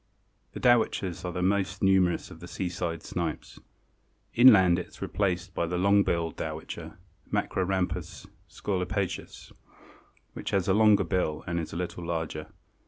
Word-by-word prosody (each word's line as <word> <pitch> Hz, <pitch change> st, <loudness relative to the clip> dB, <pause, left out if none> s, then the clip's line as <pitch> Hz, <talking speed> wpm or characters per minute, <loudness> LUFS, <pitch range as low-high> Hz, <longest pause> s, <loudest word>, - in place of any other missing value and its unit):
The -, -, -6 dB
Dowitchers 110 Hz, -7 st, +2 dB
are 90 Hz, -, -2 dB
the 90 Hz, +1 st, -3 dB
most 95 Hz, 0 st, 0 dB
numerous 95 Hz, -2 st, +2 dB
of 80 Hz, -, -11 dB
the 85 Hz, -, -9 dB
seaside 90 Hz, -3 st, -3 dB
snipes. 85 Hz, -3 st, -4 dB, 0.7 s
Inland 95 Hz, -8 st, +7 dB
it 90 Hz, -, -6 dB
is -, -, -17 dB
replaced 95 Hz, -2 st, -1 dB
by 85 Hz, -, -1 dB
the 90 Hz, +2 st, -2 dB
Long 100 Hz, +2 st, +4 dB
billed 85 Hz, -4 st, -1 dB
Dowitcher 80 Hz, 0 st, -6 dB, 0.3 s
(Macrorhamphus 95 Hz, 0 st, -1 dB, 0.2 s
scolopaceus), 95 Hz, 0 st, -3 dB, 0.8 s
which -, -, -5 dB
has 95 Hz, -3 st, 0 dB
a 95 Hz, -, +4 dB
longer 105 Hz, -1 st, +5 dB
bill 85 Hz, -3 st, -1 dB
and 85 Hz, 0 st, -2 dB
is 80 Hz, -, -5 dB
a -, -, -7 dB
little 90 Hz, 0 st, -4 dB
larger. 80 Hz, -2 st, -3 dB
90 Hz, 145 wpm, -28 LUFS, 85-95 Hz, 0.8 s, Inland